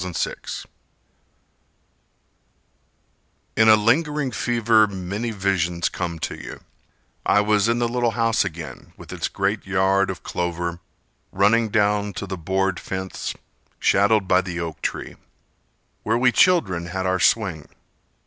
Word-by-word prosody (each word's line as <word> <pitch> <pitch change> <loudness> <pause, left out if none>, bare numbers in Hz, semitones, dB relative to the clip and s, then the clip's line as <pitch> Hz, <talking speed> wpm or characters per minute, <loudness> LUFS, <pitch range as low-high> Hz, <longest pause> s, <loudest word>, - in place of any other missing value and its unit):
Hamlet 90 -2 -5
Micure - - -4 2.9
In 110 0 +5
a 110 - +9
lingering 135 +5 +1
fever 115 0 +3
many 100 +4 -4
visions 95 -5 0
come 85 -2 -4
to 80 - -4
you: - - -9 0.6
I 100 - +4
was 105 +1 +2
in 115 - +2
the 120 0 +1
little 120 0 0
house 115 -1 +2
again 85 -4 -8
With - - -10
its - - -2
great 100 +1 -2
yard 95 0 +2
of - - -6
clover 85 0 -3 0.5
Running 110 +4 +3
down 105 -1 +1
to 100 - -5
the 95 0 -5
board 95 +2 -1
fence, 95 0 -5 0.4
Shadowed 100 0 +3
by 90 - +4
the 90 -2 -5
oak 80 -3 -5
tree, - - -4 0.8
Where 110 +2 0
we 125 +1 +4
children 100 - +3
had 95 +1 -3
our 95 0 +1
swing. 90 -8 +1
100 Hz, 135 wpm, -22 LUFS, 90-110 Hz, 2.9 s, a